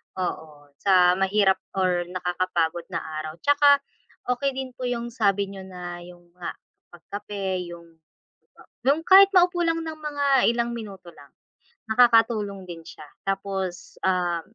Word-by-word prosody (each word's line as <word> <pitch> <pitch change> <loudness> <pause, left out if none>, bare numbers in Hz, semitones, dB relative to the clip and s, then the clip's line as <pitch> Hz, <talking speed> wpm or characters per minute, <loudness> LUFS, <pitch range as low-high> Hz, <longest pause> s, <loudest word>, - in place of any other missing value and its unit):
oo 155 -5 -6
sa 180 -2 +5
mahirap 195 0 +3 0.2
or 180 -2 +1
nakakapagod 180 -2 -2
na 170 -3 -4 0.2
araw 155 +1 -6
tsaka, 285 0 +5 0.5
okey 270 +1 -1
din 265 -1 -5
po 250 0 -5
yung 240 -1 -3
sabi 200 -4 0
niyo 190 -1 -9
na 175 -1 -7
yun 175 0 -13 0.2
nga 175 - -5 0.3
pagkape 190 0 -5
yung 170 -1 -13 0.8
yung 285 +6 +1
kahit 390 +1 +8
maupo 355 0 +3
lang 330 -1 +1
ng 315 -1 -6
mga 290 -1 -2 0.2
ilang 235 0 -1
minuto 195 -6 -9
lang. 140 -2 -17 0.6
Nakakatulong 220 -4 +3
din 170 -2 -8
siya 155 - -12 0.2
tapos, 195 -2 -4
um 180 -3 0
195 Hz, 135 wpm, -24 LUFS, 175-240 Hz, 0.8 s, kahit